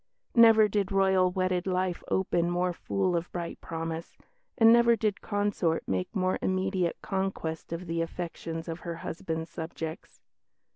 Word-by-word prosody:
Never 225 -2 +7
did 200 -2 -1
Royal 190 -1 +4
wedded 185 0 -1
life 185 -1 0
open 175 -2 +1
more 175 +1 0
full 185 +1 -1
of 170 +1 -2
bright 170 -1 -5
promise, 165 0 -5 0.4
and 225 -1 +7
never 235 0 +6
did 210 -2 -1
consort 205 -5 0
make 90 -1 -2
more 185 -1 +1
immediate 185 -2 0
conquest 190 -6 -3
of 170 +2 -4
the 165 0 -1
affections 165 -1 -5
of 165 0 -4
her 170 -1 -5
husband's 160 -1 -4
subjects. 160 -1 -6
180 Hz, 145 wpm, -29 LUFS, 165-195 Hz, 0.4 s, Never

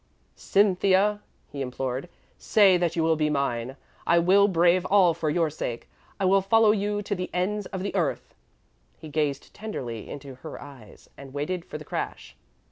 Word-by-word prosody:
"Cynthia," 200 +1 +2 0.3
he 140 - -5
implored, 130 +3 -4 0.3
"say 200 -4 +5
that 175 -2 0
you 165 - +1
will 160 0 +3
be 155 -1 0
mine, 130 -5 -1
and 135 - -11 0.3
I 170 - +4
will 190 +4 +5
brave 175 -1 +3
all 190 -4 +5
for 160 -1 -2
your 160 0 +1
sake. 120 -5 -5 0.3
I 195 - +1
will 195 +1 +4
follow 220 +2 +4
you 205 0 -1
to 205 - -3
the 180 -2 -4
ends 200 +3 -1
of 190 -2 -5
the 200 - -3
earth." 175 -7 -2 0.6
He 155 - -10
gazed 145 -2 -2
tenderly 125 - -6
into 140 -1 -8
her 160 - -8
eyes, 135 -8 -14
and 135 0 -11
waited 165 +5 -2
for - - -7
the - - -11
crash. - - -5
170 Hz, 180 wpm, -26 LUFS, 145-195 Hz, 0.6 s, say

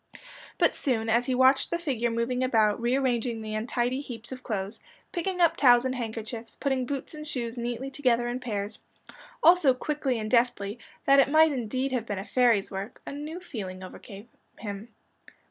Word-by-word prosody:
But - - +3
soon, 225 -6 -1
as 235 +2 +2
he 260 - +1
watched 260 +1 +4
the 340 - 0
figure 260 -9 -1
moving 235 +2 -1
about, 220 -3 +2
rearranging 245 -2 0
the 215 -1 -5
untidy 240 +4 -1
heaps 235 -4 -9
of 255 -1 -7
clothes, 200 -4 -4 0.3
picking 360 +1 -2
up 335 -1 +4
towels 245 -4 +5
and 260 - 0
handkerchiefs, 225 -1 -6
putting 265 -3 -1
boots 280 +2 -4
and 305 0 -8
shoes 240 -5 -3
neatly 240 +2 -4
together 245 -4 +1
in 245 +1 -2
pairs 210 -4 -4 0.6
all 340 +2 +9
so 285 -8 +3
quickly 275 -2 -1
and 215 -1 -4
deftly, 235 -3 +1 0.3
that 275 0 +6
it 275 - +5
might 315 +1 +6
indeed 260 +1 -2
have 240 -3 -2
been 205 - -3
a 195 - -5
fairy's 235 -6 +2
work, 195 +4 -6
a - - -6
new 300 +4 -6
feeling 190 - -7
overcame 195 +3 -10 0.3
him. 205 +1 -6
245 Hz, 180 wpm, -27 LUFS, 225-270 Hz, 0.6 s, all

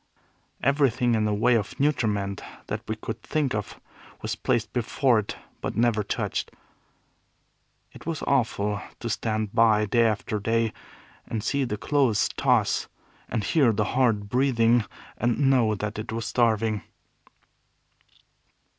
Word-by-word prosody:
Everything 130 -3 +2
in 110 -1 +2
the 105 - +1
way 120 +4 +3
of 110 -4 -1
nutriment 105 -9 0 0.2
that - - -4
we - - -2
could - - -6
think 150 -4 -1
of 105 -1 -4 0.4
was - - -2
placed 115 -2 -1
before 125 0 +2
it, 105 - -4 0.3
but - - -3
was - - -1
never 115 -2 +3
touched. 100 - -2 1.4
It - - -13
was 165 -2 -3
awful 105 -6 0 0.2
to 115 - -4
stand 110 -2 -2
by, 110 -2 +4
day 115 +2 +3
after 105 0 -1
day, 115 +2 0 0.5
and 110 -2 -3
see 140 +4 0
the 105 -3 -3
clothes 130 -3 +2
toss, - - +1 0.4
and 110 -4 -1
hear 135 0 +3
the 105 0 0
hard 115 -5 +2
breathing, 120 -2 +3 0.3
and 120 0 +1
know 115 -5 +3
that 105 +1 -4
it 110 - -5
was 115 0 -3
starving. 110 -3 +1
115 Hz, 140 wpm, -26 LUFS, 105-125 Hz, 1.4 s, by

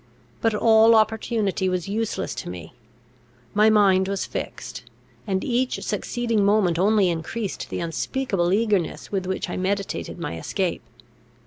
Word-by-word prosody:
But 225 -2 +2
all 225 +1 +6
opportunity 215 -3 +1
was 180 -1 -2
useless 220 +2 -2
to - - -6
me; 85 -3 -8 0.8
my 210 +1 +5
mind 195 -3 +4
was 195 0 -2
fixed, - - -6 0.4
and 190 -1 0
each 255 +1 -1
succeeding 230 -4 -1
moment 200 -5 +3
only 205 0 +4
increased 185 +6 -4
the - - -3
unspeakable 175 +2 -1
eagerness 205 -4 0
with 190 -2 -2
which 190 0 -2
I 175 - -4
meditated 195 +1 -2
my 150 - -5
escape. - - -2
200 Hz, 135 wpm, -24 LUFS, 185-220 Hz, 0.8 s, all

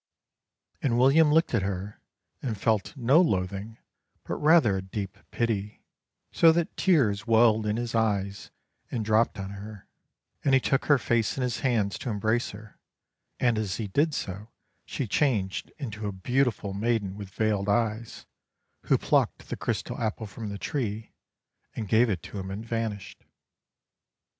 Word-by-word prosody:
And 120 -4 +1
William 145 +5 +5
looked 160 -1 +3
at 115 - +3
her 95 +1 -4 0.4
and 115 -6 -3
felt 110 +7 0
no 135 +7 +5
loathing 100 - -1 0.5
but - - -4
rather 150 - +5
a - - -3
deep 95 +1 -5
pity, 105 -3 -2 0.5
so 165 - +6
that 170 0 -1
tears 115 - +2
welled 110 -1 +4
in 105 +1 0
his 120 -1 -3
eyes 100 -3 -1 0.4
and 115 -3 -3
dropped 110 +1 +2
on 95 0 -5
her, 100 0 -9 0.6
and 135 -1 +4
he - - +6
took 135 +1 0
her 145 - +5
face 115 -2 0
in 130 - -1
his 125 -2 -1
hands 110 -7 0
to 125 - -4
embrace 110 +3 0
her, 105 +1 -12 0.6
and 120 -3 +2
as 105 -3 -2
he 110 -3 -4
did 145 +8 +1
so 100 +3 -5 0.4
she 135 - -3
changed 105 -6 0
into 110 -7 -5
a - - -2
beautiful 110 0 0
maiden 105 -2 -1
with 100 -2 -8
veiled 105 0 0
eyes, 115 +1 -1 0.6
who - - +4
plucked - - 0
the - - -2
crystal - - -3
apple 110 0 -2
from 105 +1 -7
the 100 - -5
tree 110 - -3 0.6
and 110 - -4
gave 115 +4 +4
it 90 -6 -2
to 100 - -7
him 95 0 -6
and 100 +4 -6
vanished. 115 -4 -4
110 Hz, 160 wpm, -27 LUFS, 100-120 Hz, 0.6 s, so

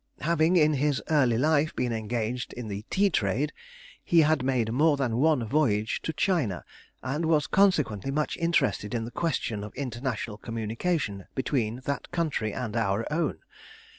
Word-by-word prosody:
Having 165 +2 +2
in 155 -3 +5
his 145 0 +1
early 130 -7 +3
life 155 +3 +2
been 120 -2 -1
engaged 115 +2 -3
in 120 -3 -6
the 100 +1 -5
tea 200 0 +2
trade, 125 - 0 0.5
he 170 -1 +4
had 155 -2 +3
made 125 -4 0
more 150 +3 +3
than 125 -5 0
one 145 -3 +3
voyage 110 -5 +1
to - - -2
China, 150 - 0 0.4
and 150 +6 -2
was 155 -3 +3
consequently 150 - +2
much 150 +2 -1
interested 165 -10 0
in 115 -1 -2
the 120 - -7
question 120 -8 -2
of 105 - -9
international 120 -4 -4
communication 115 - -2
between 125 -3 -1
that 140 0 -3
country 155 -11 -1
and 115 -2 -4
our 110 -1 0
own. 160 -1 -1
130 Hz, 160 wpm, -27 LUFS, 115-155 Hz, 0.5 s, in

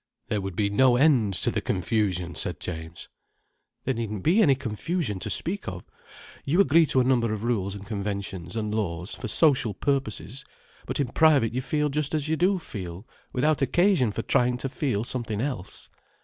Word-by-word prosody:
"There 105 -2 0
would 95 -2 -5
be 100 +1 0
no 125 +4 +4
end 125 -8 +3
to - - 0
the - - -1
confusion," 90 -1 -1
said - - -3
James. 80 +1 -7 0.8
"There 130 - 0
needn't 110 -4 -4
be 185 +8 +4
any 145 -10 +5
confusion 125 - -2
to - - -3
speak 200 +4 0
of. 90 -1 -5 0.6
You 160 +7 +1
agree 165 -2 +5
to 130 - +3
a - - +3
number 120 -3 +2
of 110 0 -3
rules 100 -5 -1
and 100 0 -9
conventions 100 -4 -4
and 105 -2 -2
laws, 90 -3 -3
for 125 - -6
social 130 - +3
purposes. 135 -1 -2 0.4
But - - -2
in 140 -4 0
private 140 -7 +4
you 130 - -1
feel 150 +2 0
just 150 +1 -1
as 150 -1 -1
you 160 - +1
do 185 +4 +2
feel, 95 - -7 0.2
without 145 +4 +1
occasion 170 - +3
for 115 - -4
trying 125 0 +2
to 135 +2 -3
feel 125 -6 -1
something 115 -4 -2
else." 125 -7 -4
120 Hz, 185 wpm, -26 LUFS, 100-145 Hz, 0.8 s, any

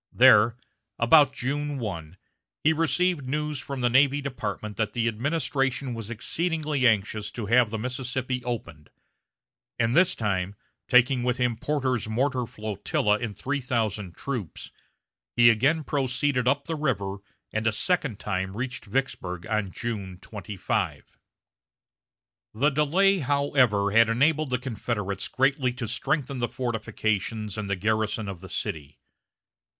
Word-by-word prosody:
There, 110 +2 +6 0.4
about 140 +4 +6
June 145 +3 -2
1, 90 -8 -5 0.5
he 160 - +5
received 165 -2 +1
news 150 0 -2
from 135 0 -5
the 120 - +3
Navy 140 +2 +4
Department 110 -6 -4
that 110 -2 -1
the 115 -1 0
administration 135 +1 -1
was 115 -2 -6
exceedingly 150 +2 0
anxious 105 -1 +1
to 115 - -4
have 115 +2 +4
the 110 - -3
Mississippi 125 +1 -3
opened; 85 -11 -5 0.9
and 115 +1 +1
this 175 +2 +5
time, 100 -3 -1 0.3
taking 125 0 +4
with 125 0 0
him 125 -2 +1
Porter's 130 -4 -1
mortar 125 +1 0
flotilla 105 - -1
and 110 -3 -5
three 140 +1 -2
thousand 110 -7 -2
troops, 120 -11 -5 0.6
he 120 -1 +7
again 140 +8 +2
proceeded 130 -2 0
up 140 +2 +2
the 165 - -3
river, 100 -10 -1 0.4
and 110 +1 0
a - - +4
second 135 - 0
time 95 0 -3
reached 125 0 -4
Vicksburg 100 -7 -3
on 110 -3 -1
June 100 -6 -4
25. 100 -1 -4 1.4
The 145 +7 +3
delay, 180 +7 +3
however, 130 -8 +2
had 115 +1 +5
enabled 145 +5 +2
the 125 - +1
Confederates 105 -5 -3
greatly 135 -1 +1
to 120 -2 -5
strengthen 140 +3 -1
the 120 - -1
fortifications 110 -3 -2
and 105 -2 -4
the 100 - +1
garrison 110 +2 -1
of 95 -3 -6
the 95 - -10
city. 75 -3 -4
120 Hz, 135 wpm, -26 LUFS, 105-140 Hz, 1.4 s, he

